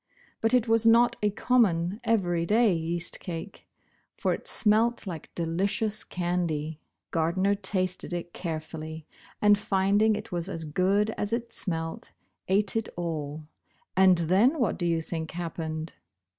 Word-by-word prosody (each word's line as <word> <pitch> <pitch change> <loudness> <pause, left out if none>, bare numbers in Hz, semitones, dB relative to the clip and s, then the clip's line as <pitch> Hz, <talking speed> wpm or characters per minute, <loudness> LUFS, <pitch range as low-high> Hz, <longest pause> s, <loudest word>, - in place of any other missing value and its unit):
But 225 +3 +3
it 245 -2 +2
was 225 0 +3
not 235 +1 +5
a 210 - +3
common 205 -5 +1
everyday 210 0 +2
yeast 170 +1 0
cake, 175 +3 -7 0.5
for - - +1
it - - -7
smelt 225 +2 +2
like 170 -5 -7
delicious 200 +6 -1
candy. 170 -4 -2 0.3
Gardner 175 +5 +1
tasted 190 -3 -1
it 175 0 -5
carefully, 160 -1 -6 0.4
and 205 0 +6
finding 205 +3 +2
it - - -7
was 175 +1 -3
as 165 -4 -5
good 190 +7 +1
as 205 - -2
it 235 0 -3
smelt, 165 -3 -1 0.4
ate 195 +2 +1
it 225 -1 -1
all, 155 -3 -4 0.5
and 185 -1 +6
then 190 - +3
w^hat 245 - -1
do 175 - 0
you 165 -1 +1
think 160 -1 -5
happened 160 -2 -5
185 Hz, 140 wpm, -27 LUFS, 165-210 Hz, 0.5 s, and